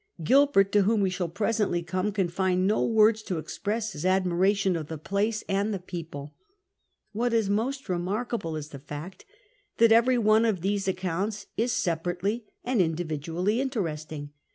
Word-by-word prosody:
Gilbert, 260 - +4
to 205 - +4
whom 210 +2 +2
wo 195 - +2
shall 180 -2 -2
presently 205 -1 0
come, 185 +5 -1
can 195 -3 0
find 185 +1 0
no 210 +3 +2
words 220 -1 +4
to 185 -5 -3
express 215 +7 -3
his 150 - -6
admiration 190 +1 +2
of 155 -3 -4
the 160 - -5
place 205 +7 -1
and 200 +2 0
the 200 - -1
people. 165 -5 -7 0.8
What 235 +2 -1
is 215 -3 +2
more 225 +6 +1 0.2
remarkable 185 0 -2
is 150 -1 -6
the 140 - -9
fact 150 +6 -9 0.5
that 230 0 +5
every 240 +3 +5
one 220 0 +4
of 215 -7 +1
these 195 +1 -1
accounts 190 +2 -2
is 235 +3 0
sejmrately 180 +6 -1 0.2
and 245 -4 +1
individually 165 - -1
interesting. 155 - -4
195 Hz, 160 wpm, -27 LUFS, 170-215 Hz, 0.8 s, that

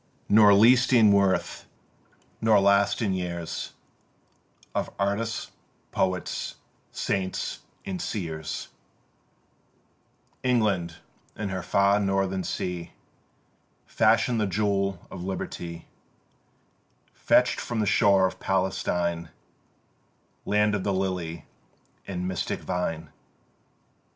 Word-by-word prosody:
Nor 105 -1 +7
least 120 +5 +5
in 110 -4 +6
worth 100 -1 +1 0.7
nor 110 -2 +5
last 100 +2 +3
in 100 -3 +1
years 85 -2 -4 1.0
Of - - -1
artists, 105 +3 -2 0.4
poets, 95 -1 -2 0.4
saints 95 -1 -2 0.3
and 185 -3 -4
seers, 80 -6 -4 1.7
England, 105 -9 +1 0.4
in 105 -2 -4
her 95 -1 -3
far 100 +3 +3
northern 95 -1 0
sea, 90 -2 -4 0.9
Fashion'd 115 +1 +2
the 105 - +1
jewel 100 -1 -1
of 90 -2 -7
Liberty, 85 -3 -5 1.3
Fetch'd - - +3
from 120 -2 -3
the 105 - +1
shore 100 -2 +4
of 95 - -3
Palestine 90 -3 -1 1.2
(Land 105 0 +2
of 100 -2 -1
the 100 - 0
Lily 90 -4 -3 0.6
and 90 -1 -3
mystic 90 -2 -3
Vine). 80 -4 -3
95 Hz, 95 wpm, -26 LUFS, 90-105 Hz, 1.7 s, Nor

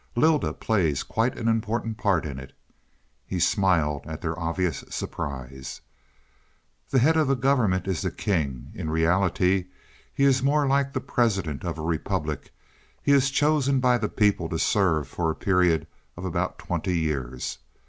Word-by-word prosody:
"Lylda 155 +4 +3
plays 85 -11 0
quite 115 +3 -1
an 115 - -2
important 115 0 -1
part 95 -6 +1
in 70 -3 -5
it." 65 - -11 0.7
He 90 - -4
smiled 85 -7 +2
at 80 -1 -6
their 80 -1 -3
obvious 85 -1 -1
surprise. 65 -1 -6 1.1
"The 135 - +2
head 150 +6 +4
of 155 -3 +3
the 135 - +3
government 115 -9 +1
is 95 -4 -1
the - - 0
king. 75 -10 -2
In 80 - -4
reality 90 +3 +2 0.4
he 140 - -1
is 135 -2 +4
more 145 +2 +2
like 140 0 +1
the - - -1
president 100 - 0
of 85 -3 -3
a 80 - -5
republic; 80 -1 -2 0.5
he - - +2
is 140 -1 +5
chosen 140 -1 +2
by 125 -1 +3
the 105 - -1
people 100 -6 +1
to 80 - -2
serve 80 -6 +2
for 80 -2 -2
a 80 - -1
period 90 -4 +2 0.3
of - - -6
about - - -2
twenty 90 -1 -2
years. 65 -6 -3
95 Hz, 160 wpm, -25 LUFS, 80-125 Hz, 1.1 s, is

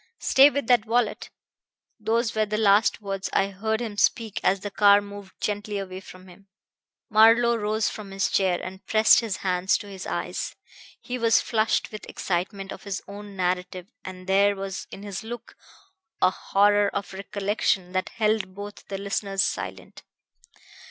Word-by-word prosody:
Stay 275 +2 +6
with 285 -2 -2
that 235 -2 +3
wallet.' 230 -1 0 0.7
Those 225 +2 0
were 215 -1 +1
the 215 +1 -2
last 210 0 +3
words 195 -1 -3
I 195 - +2
heard 220 +3 -2
him 220 -3 -5
speak 225 0 +1
as 190 0 +2
the 205 - -5
car 200 0 +6
moved 200 -1 -11
gently 205 0 -2
away 190 -1 -5
from 185 -1 -14
him." 190 +2 -17 0.6
Marlowe 230 +2 +6
rose 215 -1 0
from 210 -2 -6
his 195 0 0
chair 185 -3 +2
and 190 +1 -8
pressed 220 0 +6
his 220 -5 -3
hands 185 +1 +2
to 205 - -10
his 190 -2 -8
eyes. - - -3 0.4
He 250 -1 -5
was 230 -1 +4
flushed 220 -2 0
with 215 - -7
the - - -12
excitement 195 +2 -3
of - - -8
his 200 -2 -5
own 205 0 -9
narrative, 180 0 -2
and 185 -1 -9
there 200 +1 +3
was 195 -1 -6
in 200 - -10
his 200 0 -6
look 235 +2 -8 0.6
a 185 - +4
horror 205 +1 +3
of 200 -1 -5
recollection 195 -1 -1
that 185 0 -1
held 215 -3 0
both 205 +1 -9
the 195 - -4
listeners 195 -1 -1
silent. - - -5
200 Hz, 170 wpm, -25 LUFS, 195-215 Hz, 0.7 s, Stay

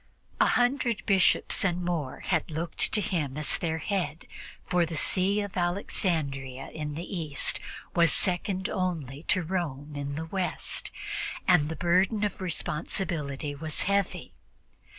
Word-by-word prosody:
A - - +6
hundred 245 -2 +2
Bishops 195 -3 +3
and 180 -2 +1
more 160 -7 -2
had 165 -3 0
looked 165 +1 0
to 210 - +3
him 150 -8 -1
as 155 - +1
their 160 -2 -1
head, 175 -1 -2 0.4
for 180 -1 +2
the 165 -1 -3
See 195 +6 +3
of 205 -2 -5
Alexandria 155 -7 -1
in 150 -1 -4
the 165 - -4
East 150 -4 0 0.4
was 170 -2 +5
second 185 +1 +1
only 160 -8 -2
to 185 - +3
that - - -6
of 165 - -8
Rome 150 -6 -2
in 140 0 -3
the 160 +2 -3
West, 185 +2 -1 0.6
and 170 -5 +5
the 160 - -3
burden 185 +5 +2
of 205 -2 -2
responsibility 155 -4 -2
was 155 +2 -1
heavy. 200 -1 0
170 Hz, 150 wpm, -28 LUFS, 150-190 Hz, 0.6 s, A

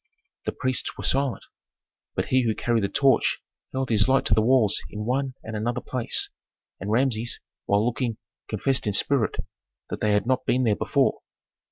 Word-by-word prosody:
The - - 0
priests 130 -1 -1
were - - -6
silent, 135 -2 0 0.7
but - - -2
he 130 0 +4
who 115 -3 0
carried 115 -3 0
the 100 - 0
torch 135 +3 +3 0.3
held 130 -1 -2
his 105 -3 +4
light 135 0 +3
to - - +3
the 110 - +4
walls 115 -3 +3
in 105 0 -5
one 130 +2 -1
and 110 0 -6
another 120 +3 -1
place, 125 -1 0 0.5
and 100 - -5
Rameses, 120 0 +1 0.3
while 100 +2 +3
looking, 120 -2 -1 0.3
confessed 135 -4 0
in 105 - +1
spirit 125 +3 +2 0.6
that - - -4
they 105 -1 +2
had 105 0 +2
not 130 +1 +1
been 130 +1 +2
there 110 -4 +3
before. - - +1
120 Hz, 180 wpm, -25 LUFS, 110-130 Hz, 0.7 s, he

